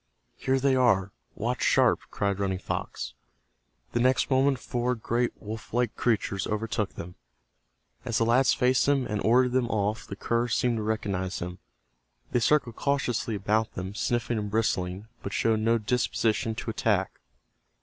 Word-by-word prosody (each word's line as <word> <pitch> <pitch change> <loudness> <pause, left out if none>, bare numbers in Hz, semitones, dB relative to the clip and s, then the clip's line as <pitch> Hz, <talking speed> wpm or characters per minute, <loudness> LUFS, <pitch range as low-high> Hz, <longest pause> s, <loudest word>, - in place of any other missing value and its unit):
"Here 135 0 0
they 135 0 +3
are—watch 100 -7 0
sharp!" - - +4
cried 100 -1 -1
Running 95 -2 0
Fox. - - -4 0.8
The 120 - 0
next 130 +3 +2
moment 135 +1 +3
four 125 +1 -1
great 120 +2 0
wolf 110 +1 -7
like 120 -2 +1
creatures 105 -5 0
overtook 105 -1 -2
them. 90 +1 -7 0.9
As 120 -3 -1
the 115 - +2
lads 125 +3 +4
faced 125 0 +2
them 140 -2 +2
and 105 -2 -2
ordered 125 +2 +4
them 125 -1 +1
off 105 0 -1
the 100 - -6
curs 115 +2 0
seemed 120 -2 +1
to - - -2
recognize 100 -4 -2
them. 90 +1 -6 0.7
They 120 - +2
circled 120 -1 +2
cautiously 135 -5 0
about 105 +3 0
them, 95 +2 -5
sniffing 120 0 -1
and 105 -1 -3
bristling, 100 -3 -1 0.2
but 100 - -5
showed 110 -1 +2
no 115 +2 +3
disposition 115 0 0
to 115 - -4
attack. 100 -4 0
115 Hz, 155 wpm, -27 LUFS, 100-125 Hz, 0.9 s, sharp